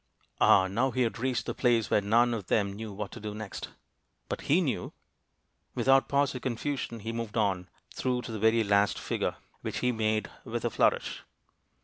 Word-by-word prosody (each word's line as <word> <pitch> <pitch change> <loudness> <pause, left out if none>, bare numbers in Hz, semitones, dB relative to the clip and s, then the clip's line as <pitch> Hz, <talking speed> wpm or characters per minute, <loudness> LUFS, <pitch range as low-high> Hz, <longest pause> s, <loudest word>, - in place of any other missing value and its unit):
Ah! 95 - +6
now 115 +8 +1
he 130 0 +1
had 115 - -2
reached 130 0 -1
the - - -2
place 120 -4 +2
where - - +4
none 120 +4 +3
of 105 -5 -4
them 100 -2 +1
knew 110 +1 -6
what 105 +2 -5
to - - -8
do 105 -1 -5
next. 105 -2 -6 0.6
But - - -3
he 155 +6 +5
knew! 150 -8 -2 0.8
Without 135 0 +4
pause 140 0 +2
or 125 - -4
confusion, 125 -1 -3
he 110 +2 -4
moved 115 -1 -4
on, 95 -4 0 0.2
through 125 -1 -1
to 120 - -6
the 110 - -4
very 110 +1 +4
last 100 0 +3
figure, - - -2 0.3
which - - -4
he 125 - +2
made 110 -2 0 0.2
with - - -4
a - - 0
flourish. - - +1
115 Hz, 195 wpm, -29 LUFS, 105-125 Hz, 0.8 s, Ah